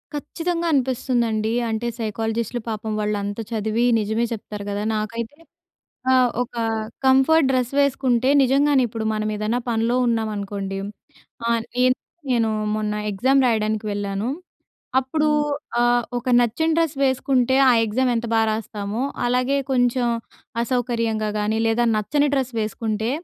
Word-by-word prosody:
ఖచ్చితంగా 335 +3 -2
అనిపిస్తుందండి. 240 -4 0 0.2
అంటే 225 +2 -2
సైకాలజిస్ట్‌లు 225 +2 -2
పాపం 220 0 -4
వాళ్ళంత 205 0 -2
చదివి 220 +2 0
నిజమే 220 +3 0
చెప్తారు 210 -2 -7
కదా! 205 +1 -2
నాకైతే 230 +5 -4 0.7
ఆహ్, 255 -1 +5
ఒక 245 0 -4 0.5
కంఫర్ట్ 270 +3 +5
డ్రెస్ 255 -2 +1
వేసుకుంటే 260 -3 +2
నిజంగానే 275 +1 +3
ఇప్పుడు 225 0 -5
మనమేదైనా 215 +2 -1
పనిలో 230 +1 +1
ఉన్నామనుకోండి 205 -4 -2 0.7
ఆహ్, 230 -1 +1 0.2
ఏం 255 - +5 0.4
నేను 230 -2 +2 0.3
మొన్న 215 -1 -1 0.2
ఎగ్జామ్ 260 +8 +2
రాయడానికి 215 -2 0
వెళ్ళాను. 200 +2 -2 0.7
అప్పుడూ 300 +4 0 0.5
ఆహ్, 240 0 +3 0.2
ఒక 240 - -11
నచ్చిన 240 +7 +1
డ్రెస్ 325 -3 +1
వేసుకుంటే 260 -1 +2
ఆ - - +6
ఎగ్జామ్ 245 +4 +1
ఎంత 230 +1 -2
బాగా 225 0 +3
రాస్తామో! 215 +1 -4 0.2
అలాగే 250 +3 +1 0.2
కొంచెం 245 -1 +2 0.6
అసౌకర్యంగా 230 -3 -1
గానీ 210 +1 0
లేదా 225 +2 +2
నచ్చని 285 +8 +1
డ్రెస్ 260 -2 -1
వేసుకుంటే, 220 +1 -2
230 Hz, 120 wpm, -22 LUFS, 215-255 Hz, 0.7 s, ఆ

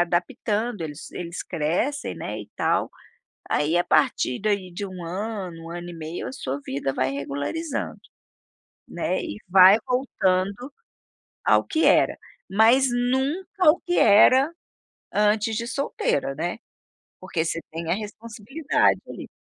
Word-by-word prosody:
adaptando 210 +4 -1
eles-eles 165 +3 -6
crescem, 180 - -1
né, - - -5
e - - -12
tal, - - +1 0.6
aí, 150 +4 +2
à 175 - +3
partir 145 -4 +2
daí 200 -3 -1
de 200 +4 -5
1 185 -2 -8
ano, 185 -2 -5
1 165 - -8
ano 175 0 -6
e - - -8
meio 160 +1 -6
a - - -5
sua 140 - -4
vida 135 0 -3
vai 130 +1 0
regularizando, 145 - -4 0.9
né, - - -2
e 320 -9 -5
vai 190 +2 +8
voltando 210 -2 0 0.7
ao - - +4
que 320 - 0
era, - - +4 0.3
mas 235 +6 +5
nunca 290 +9 +2
o 335 - -1
que 355 - -1
era 255 +8 +6 0.6
antes 210 +2 +2
de 235 +1 -2
solteira, 145 - -1
né. 175 +8 -3 0.6
Porque 170 -3 -2
você 165 0 -2
tem 165 +1 -5
a - - +3
responsabilidade, 225 +7 -1
ali, - - -8
200 Hz, 135 wpm, -24 LUFS, 170-250 Hz, 0.9 s, vai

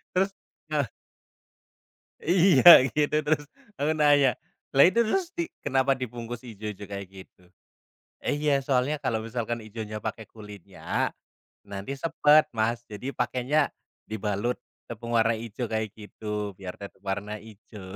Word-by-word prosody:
terus, 190 +2 +2 0.4
heeh. - - +1 1.3
Iya 175 -5 +8
gitu 150 0 +1
terus 150 -1 +1 0.3
aku 145 +2 +1
nanya, 145 -3 +4 0.4
"Lah 140 - +8
itu 230 +5 +2
terus 360 - -1
di 340 -2 -3 0.2
kenapa 135 0 +2
dibungkus 120 -1 -6
hijau-hijau 105 -3 -7
kayak 100 -1 -5
gitu, 95 -1 -15 0.8
'iya 145 -1 +1
soalnya 135 +2 +1
kalau 120 -5 0
misalkan 120 0 -3
hijaunya 110 0 -6
pakai 110 0 -4
kulitnya, 105 -3 -4 0.6
nanti 100 +6 -6
sepet 155 0 +4
Mas, 115 +1 -1
jadi 115 +6 -5
pakainya, 125 +4 +1 0.4
dibalut 110 +2 -2 0.3
tepung 115 +1 -2
warna 115 +1 +3
hijau 115 +2 -5
kayak 110 -1 -1
gitu 105 -1 -5
biar 95 -2 -7
tetap 100 -1 -11
warna 100 +2 -3
hijau'" 105 -3 -12
115 Hz, 125 wpm, -27 LUFS, 105-140 Hz, 1.3 s, Iya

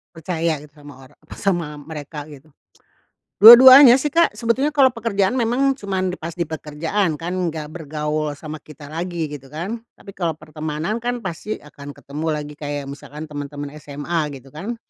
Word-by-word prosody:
Percaya 165 -1 -2
gitu 145 0 -15
sama 145 -1 -13
orang - - -22 0.2
sama 175 -5 0
mereka 150 0 -8
gitu. 150 0 -14 0.9
Dua-duanya 250 +4 +11
sih 275 +2 -1
Kak, 335 -9 +3
sebetulnya 230 +5 0
kalau 270 -3 +5
pekerjaan 215 -5 0
memang 245 +4 +2
cuman 190 -7 -2
di - - -8
pas 165 0 -6
di 175 - -1
pekerjaan 160 +3 -2
kan 165 +3 -5 0.2
nggak 155 -2 -5
bergaul 150 -2 -3
sama 155 +1 -8
kita 150 0 -13
lagi 165 -1 -4
gitu 135 -2 -9
kan. 175 - -5 0.2
Tapi 195 - -12
kalau 170 -5 -2
pertemanan 155 +7 -4
kan 245 -1 -3
pasti 190 +4 -4
akan 145 -1 -12
ketemu 150 +3 -6
lagi, 150 0 -6
kayak 145 -1 -4
misalkan 145 +2 -9
temen-temen 145 0 -6
SMA 145 +3 -4 0.2
gitu 135 +1 -14
kan, 195 - -5
160 Hz, 165 wpm, -21 LUFS, 150-200 Hz, 0.9 s, Dua-duanya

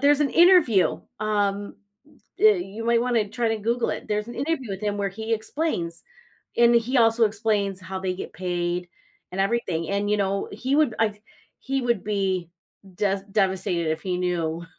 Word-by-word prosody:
there's 290 +1 +4
an 280 - +2
interview, 335 - +5 0.2
um, 205 -1 -1 0.6
you 210 +1 +2
might 235 0 +3
wanna 235 -4 +1
try 230 +2 -1
to 225 0 -1
Google 235 +3 0
it. - - -6
There's 210 +1 -1
an 240 - -7
interview 280 -4 -2
with 190 -1 -4
him 205 -1 -1
where 200 -1 0
he 220 +3 -5
explains, 215 - -3 0.5
and 235 0 +5
he 240 +3 +2
also 225 0 +4
explains 205 -3 0
how 190 0 -6
they 185 -1 -2
get 185 - -7
paid 175 0 -2 0.4
and 190 - -2
everything, 195 -6 0
and, 200 +1 0
you 210 - +3
know, 195 0 -1
he 270 +3 -1
would 295 -8 +3
I 210 -2 0 0.4
he 270 +1 -2
would 235 -5 0
be 190 -4 -1 0.5
des 195 -1 0
devastated 190 -4 0
if 160 - -5
he 185 -2 -1
knew 170 -2 -1
205 Hz, 175 wpm, -24 LUFS, 190-235 Hz, 0.6 s, interview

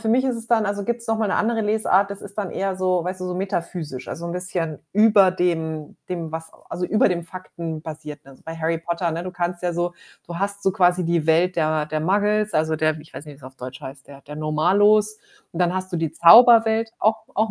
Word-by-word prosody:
für 225 - -3
mich 255 +4 +3
ist 255 -2 0
es 230 0 -7
dann 220 -3 +2
also, 200 0 -2
gibt's 235 +1 -3
noch 225 0 0
mal 220 -2 0
'ne - - +1
andere 225 +1 0
Lesart, 210 -2 +2
das 200 - -7
ist 200 0 -11
dann 200 -4 -3
eher 195 -1 -2
so 185 -2 0
weißt 185 +1 -4
du, 185 - -3
so 180 - -4
metaphysisch. 170 -8 -4
Also, 170 - -6
'n 170 - -4
bisschen 175 -4 -4
über 210 -2 +5
dem 160 -4 -2
dem, 170 -3 -5
was 160 0 -6 0.2
also, 180 +1 -3
über 215 - +3
dem 175 -2 -2
Faktenbasierten. 160 -4 -8
Also, 135 - -18
bei 165 0 -7
Harry 165 0 -1
Potter 170 0 -2
ne, 165 +2 -4
du 185 - -5
kannst 175 0 -3
ja 175 -1 -1
so 175 +1 -2 0.3
du 170 - -7
hast 200 0 -3
so 190 - +3
quasi 180 -1 +2
die 165 -2 0
Welt 170 +3 +3
der 155 -2 0
der 155 0 -3
Muggles, 210 +4 +1
also, 155 0 +1
der 155 0 0
ich 155 +1 -16
weiß 145 - -8
nicht, 150 -2 -11
wie's 135 - -18
auf 130 0 -11
Deutsch 125 +1 -9
heißt, 135 0 -10
der 140 -1 -13
der 150 - -10
Normalos. 205 +8 +2 0.3
Und 170 - -5
dann 175 0 +2
hast 185 0 -4
du - - -1
die 165 -2 -1
Zauberwelt 225 +5 +6
auch 220 +1 +1
auch 220 +1 +1
180 Hz, 240 wpm, -22 LUFS, 160-205 Hz, 0.3 s, Zauberwelt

